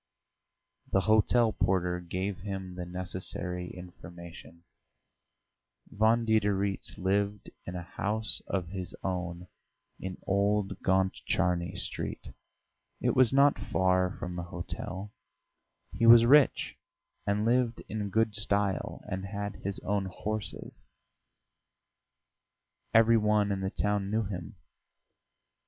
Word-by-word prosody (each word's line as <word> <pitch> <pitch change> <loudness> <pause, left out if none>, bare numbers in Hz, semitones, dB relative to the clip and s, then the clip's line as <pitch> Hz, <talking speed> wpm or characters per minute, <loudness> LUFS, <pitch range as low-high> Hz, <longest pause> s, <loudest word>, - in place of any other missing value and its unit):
The 95 - +3
hotel 110 +3 +3
porter 90 -1 +1
gave 90 +3 -3
him 95 -2 -5
the 90 -1 -6
necessary 90 0 -4
information; 85 -1 -11 1.3
Von 110 +2 +3
Diderits 100 -3 0
lived 100 +2 -1 0.2
in 90 - -5
a 90 - -4
house 105 +5 -1
of 90 -3 -2
his 95 -1 -6
own 90 -2 -3 0.5
in 95 0 -5
Old 100 0 +1
Gontcharny 95 -2 0
Street - - -5 0.7
it - - +1
was 130 -3 +5
not 140 +1 +4
far 90 0 +2
from 90 0 -5
the 90 - -3
hotel: 95 +3 -6 0.8
he 115 - +2
was 115 0 +9
rich 140 +3 +4 0.5
and 105 +1 +1
lived 120 -1 +1
in 105 -2 -3
good 110 +1 +1
style, 100 -2 +1
and 95 +1 -4
had 100 0 -5
his 100 0 -3
own 100 0 -1
horses; 105 +3 -5 2.0
every 115 +1 +6
one 105 -1 +2
in 100 - -1
the 95 - -1
town 105 0 -1
knew 110 +2 +1
him. 90 -5 -6
100 Hz, 110 wpm, -30 LUFS, 90-105 Hz, 2.0 s, was